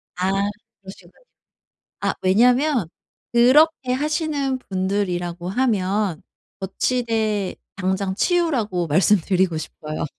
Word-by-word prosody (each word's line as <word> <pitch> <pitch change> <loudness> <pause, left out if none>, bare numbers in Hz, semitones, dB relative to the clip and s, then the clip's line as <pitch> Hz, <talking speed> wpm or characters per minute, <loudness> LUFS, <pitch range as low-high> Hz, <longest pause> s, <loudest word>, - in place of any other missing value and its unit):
아 185 +1 0 0.5
그러시군요. 190 -2 -13 0.9
아 - - 0
왜냐면 245 - +3 0.5
그렇게 260 +3 +4
하시는 295 -1 -1
분들이라고 185 -4 -2
하면 200 -5 0 0.4
거치대 215 -1 -1 0.2
당장 190 0 -1
치우라고 235 - 0
말씀드리고 185 +1 +2
싶어요. 155 0 -5
200 Hz, 235 characters per minute, -22 LUFS, 185-255 Hz, 0.9 s, 그렇게